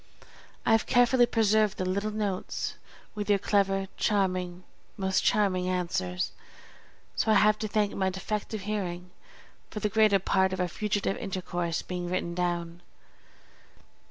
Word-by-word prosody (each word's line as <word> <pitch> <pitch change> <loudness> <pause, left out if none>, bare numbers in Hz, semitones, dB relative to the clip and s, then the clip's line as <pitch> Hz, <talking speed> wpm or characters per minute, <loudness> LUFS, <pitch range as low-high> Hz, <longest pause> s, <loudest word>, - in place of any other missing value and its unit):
I - - +3
have 225 0 +3
carefully 245 0 +4
preserved 215 -2 +2
the 185 - -2
little 200 +3 -1
notes 210 -3 -3 0.4
with 210 -1 -4
your 205 - +5
clever, 195 -1 +1
charming, 185 -3 0 0.3
most 190 -1 +1
charming 185 -3 +2
answers; 170 - -1 0.8
so 220 - +2
I - - +5
have 215 0 +4
to 215 - -2
thank 210 -1 0
my 190 -1 +1
defective 210 +2 -4
hearing 180 -3 -4 0.6
for 210 - -5
the 210 - 0
greater 215 -2 +4
part 190 0 +1
of 185 - -4
our 180 - +1
fugitive 205 +1 -1
intercourse 175 -3 -3
being 180 -1 -4
written 175 -1 -2
down. 175 -1 -2
195 Hz, 140 wpm, -28 LUFS, 180-210 Hz, 0.8 s, your